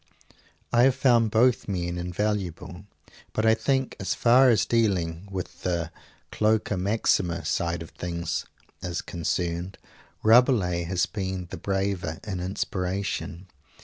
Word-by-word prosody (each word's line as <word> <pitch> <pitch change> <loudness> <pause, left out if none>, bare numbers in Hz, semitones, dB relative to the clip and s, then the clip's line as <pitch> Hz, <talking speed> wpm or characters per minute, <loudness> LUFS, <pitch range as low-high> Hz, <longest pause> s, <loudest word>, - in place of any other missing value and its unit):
I 120 - +5
have 135 -1 +4
found 120 -4 +4
both 115 +3 +3
great 100 -3 -1
men 85 0 -3
invaluable; 90 -1 -3 0.5
but 110 - 0
I 110 - +6
think 130 +4 0
as 95 - -1
far 125 +2 +5
as 115 - +3
dealing 95 -6 0
with 95 -2 -6
the 85 -2 -1 0.4
Cloaca 110 -1 +1
Maxima 95 -3 0
side 85 -1 -1
of 80 - -13
things 85 -2 -4 0.3
is 90 -1 -3
concerned, 85 +2 -3 0.5
Rabelais 110 -7 +4
has 90 +1 +1
been 95 -3 -4
the - - -5
braver 95 -4 -2
in 95 -4 -4
inspiration. 95 -1 -3
95 Hz, 130 wpm, -26 LUFS, 85-110 Hz, 0.5 s, I